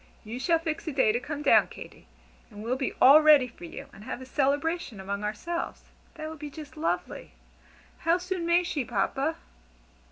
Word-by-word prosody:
You 225 +3 -6
shall 330 +5 +3
fix 325 0 -4
a - - -1
day 265 -6 +3
to 235 - 0
come 295 +3 -5
down, - - +5
Katy, - - -12 0.4
and 210 -2 -10
we'll 240 +3 0
be 265 0 -2
all 280 +4 +9
ready 300 -4 +6
for 230 -7 -12
you, 165 - -8
and 200 - -13
have 245 - -5
a 260 - -9
'celebration' 285 - -1
among 200 +2 -4
ourselves. 280 +12 -4 0.3
That 310 0 -6
would 315 -1 -8
be 295 0 -6
just 290 -2 -10
lovely! 315 +2 -3 0.7
How 335 +1 +2
soon 360 0 -4
may 345 +1 +4
she, 305 -5 -2
Papa?" 270 +9 -1
285 Hz, 190 wpm, -28 LUFS, 240-325 Hz, 0.7 s, all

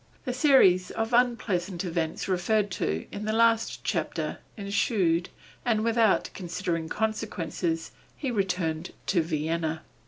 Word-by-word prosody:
The 250 - -1
series 250 - +5
of 225 +2 -3
unpleasant 205 -7 +1
events 165 -2 -2
referred 195 +3 +1
to 80 - -2
in 205 +1 -5
the 215 - 0
last 230 0 +2
chapter - - -2 0.2
ensued, 200 -4 +1 0.3
and, 220 -3 +1
without 230 -2 +3
considering 175 -2 -3
consequences, 185 -6 -2 0.3
he 270 -4 -2
returned 180 -6 -1
to 180 -3 +2
Vienna. 160 0 -2
190 Hz, 120 wpm, -27 LUFS, 165-225 Hz, 0.3 s, series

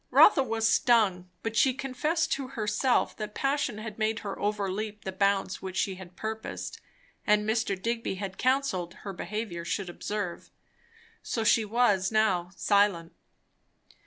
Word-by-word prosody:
Rotha 340 -9 +7
was 225 -3 0
stung, 215 -6 +3
but 225 0 -3
she 255 +3 +4
confessed 300 +5 -1
to 270 -1 -1
herself 235 0 +1
that 215 -1 -6
passion 275 -5 0
had 215 0 -7
made 220 +1 0
her 200 - -4
overleap 210 +1 -2
the 190 - -3
bounds 195 0 +1
which 190 -1 -5
she 195 - +1
had 185 -1 -11
purposed, 220 +2 -5 0.5
and 210 0 +3
Mr. 220 -3 0
Digby 230 -1 -2
had 190 -1 -6
counselled, 255 -10 0
her 195 - -4
behaviour 185 -1 -4
should 185 +1 -3
observe. 200 -1 -4 0.7
So 225 - -2
she 220 0 +4
was 205 -4 +2
now 190 -5 +2
silent. 200 -6 +2
210 Hz, 145 wpm, -28 LUFS, 190-230 Hz, 0.7 s, Rotha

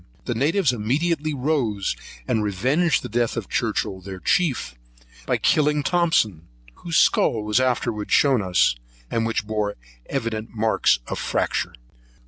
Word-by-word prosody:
The 120 - -1
natives 145 - +2
immediately 150 +8 0
rose, 125 -8 0 0.3
and 110 - +1
revenged 130 - +1
the - - -4
death 120 +1 -1
of - - -3
Churchhill 95 -1 -1
their 95 0 -8
chief, 135 - 0 0.5
by - - +2
killing 150 -1 +2
Thomson, 140 - +1 0.3
whose 170 -2 -2
skull 110 -2 +3
was 105 +3 +2
afterwards 120 -4 -1
shown 135 -4 +4
to 95 - -3
us, 90 -7 +3 0.4
which 115 -1 0
bore 105 -1 -2 0.3
evident 115 0 -3
marks 110 - +3
of - - -4
fracture. - - -1
115 Hz, 135 wpm, -23 LUFS, 105-150 Hz, 0.5 s, shown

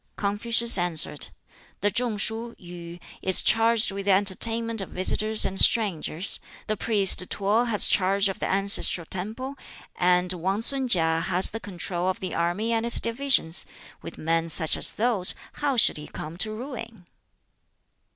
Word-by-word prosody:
Confucius 230 +2 +1
answered, 165 -4 0 0.5
"The 205 +2 0
Chung 235 +1 -1
shuh, 225 +3 -4
Yu, 175 -1 -11 0.2
is 190 -1 +5
charged 225 0 +2
with 195 0 -7
the 195 - +4
entertainment 225 +3 +2
of 190 - -8
visitors 215 +4 0
and 190 0 -1
strangers; 190 -4 +1 0.3
the 215 - -3
priest 205 -3 +4
T'o 210 +4 0
has 220 -4 +3
charge 195 +1 +1
of 195 - -6
the - - -3
ancestral 195 -3 0
temple; 225 - -7 0.4
and 180 0 +1
Wang 190 +4 -3
sun 265 +2 +4
KiŠ 165 -4 +2
has 185 0 +2
the 225 - -6
control 180 -2 -4
of 185 - -4
the 185 - -6
army 175 +7 -2
and 225 0 -1
its 235 - +3
divisions: 230 -8 0 0.3
with - - -11
men 165 +1 -2
such 160 0 +2
as - - +2
those, 215 -5 +2 0.3
how 280 -3 -1
should 220 - +3
he 150 - -10
come 155 +2 -9
to 215 +4 +1
ruin?" 230 -4 -9
200 Hz, 160 wpm, -24 LUFS, 180-230 Hz, 0.5 s, is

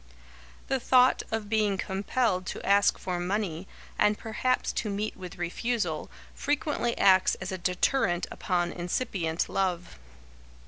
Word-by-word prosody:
The 270 0 0
thought 255 +1 +4
of 220 -2 -3
being 210 -2 +1
compelled 190 0 -1
to - - -5
ask 200 +1 +4
for 180 -1 -3
money, 185 -1 -2 0.3
and 210 0 +3
perhaps 255 +3 -1
to 215 - -2
meet 205 +2 -2
with 180 -2 -9
refusal, 175 -1 -2 0.2
frequently 290 -4 -1
acts 190 -1 +5
as 185 +1 -6
a 190 - -3
deterrent 180 +1 +1
upon 175 -2 -1
incipient 175 -2 -2
love. 180 - -2
195 Hz, 130 wpm, -28 LUFS, 180-225 Hz, 0.3 s, acts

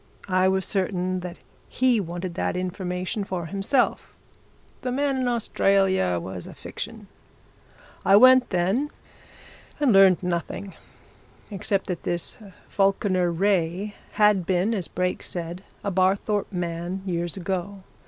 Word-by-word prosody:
I 185 0 +4
was 190 0 +1
certain 185 -1 0
that 180 -1 -7 0.3
he 255 -3 +2
wanted 175 -1 -4
that 180 - -1
information 185 +2 -3
for 185 -3 -4
himself 195 - 0 0.7
the 250 - -2
man 275 +1 0
in 260 -1 0
Australia 195 - +2
was 90 0 -7
a - - -10
fiction. - - -7 1.0
I 195 - +6
went, 255 +3 +7
then 195 +11 +1 0.9
and 280 -6 +4
learned 190 -2 +6
nothing. 180 +2 -3 0.8
Except 200 0 -1
that 180 -2 -4
this 175 -1 -3 0.3
Falkiner 195 -2 +1
Wraye 190 +2 0 0.2
had 210 -4 +3
been, 185 +4 +1
as 190 -6 -2
Brake 180 0 -2
said, 175 +1 -5 0.2
a 200 - -1
Barthorpe 195 +3 +1
man, 175 +1 -3
years 175 -1 -2
ago. 190 +1 -4
190 Hz, 125 wpm, -25 LUFS, 175-205 Hz, 1.0 s, went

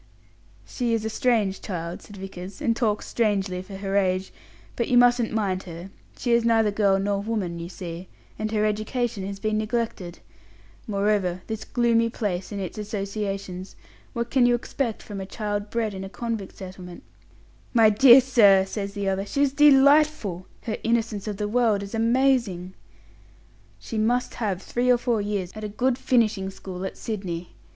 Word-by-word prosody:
"She 240 -3 -1
is 220 -1 -3
a 220 - -2
strange 215 -6 +1
child," 170 -3 -5
said 205 - -13
Vickers, 190 +1 -8
"and 240 -7 +1
talks 215 -3 0
strangely 195 -5 0
for 195 +1 -10
her 195 0 -3
age; 185 -1 +1 0.4
but 235 - -1
you 245 - +3
mustn't 245 -1 +4
mind 195 -4 0
her. 175 +2 -9 0.3
She 240 - -1
is 235 0 +4
neither 225 -2 +3
girl 200 -2 +3
nor 200 0 0
woman, 200 -6 -3
you 170 +1 -6
see; 180 -1 -7 0.3
and 215 0 -2
her 215 -1 +1
education 215 0 -1
has 200 0 -5
been 215 0 0
neglected. 215 -5 -3 0.7
Moreover, 200 -3 0
this 220 -1 -5
gloomy 230 -1 +2
place 195 -5 -3
and 200 - -4
its 190 +2 -5
associations 200 -2 -4 0.4
what 235 0 -3
can 255 -3 +4
you 240 - +4
expect 240 -1 -3
from 200 -2 -6
a - - -5
child 205 0 -3
bred 225 -2 -1
in 190 0 -6
a 195 - -6
convict 225 -2 -5
settlement?" 185 -2 -9 0.7
"My 225 -3 +5
dear 250 +4 +8
sir," 205 -7 +5
says 200 +1 -5
the 200 -1 -2
other, 195 0 0
"she's 280 +1 +1
delightful! 280 - +4 0.2
Her 220 - -3
innocence 225 -3 0
of 205 -2 -3
the 210 - -2
world 220 -3 +2
is 200 - -9
amazing!" 230 -6 +1 1.0
"She 225 - -5
must 240 +3 +1
have 195 -4 -1
three 245 +1 -1
or 250 - +6
four 235 -3 0
years 200 -3 -2
at 215 - -8
a 210 - -3
good 250 +4 0
finishing 215 -7 +1
school 190 -1 -7
at - - -6
Sydney. 180 -6 -4
210 Hz, 175 wpm, -25 LUFS, 195-235 Hz, 1.0 s, dear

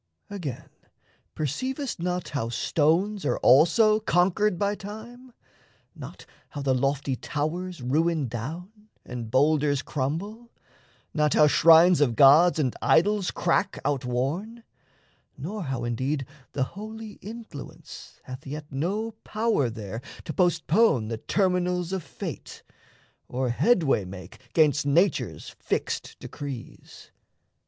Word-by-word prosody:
Again, 165 -12 -6 0.7
perceivest 255 - -3
not 180 +1 -2
How 125 -6 -2
stones 170 - +1
are - - 0
also 175 - +5
conquered 190 0 +2
by 200 +2 0
Time? 220 +5 -10 0.6
Not - - -10 0.2
how 145 - -6
the 135 -1 +2
lofty 135 +1 0
towers 155 +4 -4
ruin 155 +2 +1
down, 175 - -7 0.2
And 120 -3 -6
boulders 145 +2 +2
crumble? 195 - -4 0.6
Not 150 -1 +2
how 150 - +6
shrines 165 +2 +6
of 125 -6 +2
gods 150 +7 +7
And 135 -6 0
idols 200 +3 +3
crack 195 -1 0
outworn? 145 - -2 0.7
Nor 190 +6 -5
how 130 -3 -3
indeed 130 +4 -2 0.3
The 135 - 0
holy 215 +6 -8
Influence 220 -7 -10
hath 130 +1 -9
yet 150 +2 -7
no 195 +11 -2
power 215 - 0
There 110 0 -6 0.2
to 155 - -4
postpone 170 - +2
the 115 - -3
Terminals 180 - 0
of 190 - -1
Fate, - - -8 0.6
Or 130 0 -2
headway 140 - +2
make 90 0 -10
'gainst 150 -2 +3
Nature's 165 +5 +1
fixed - - -3
decrees? 140 -5 -9
160 Hz, 115 wpm, -26 LUFS, 135-200 Hz, 0.7 s, gods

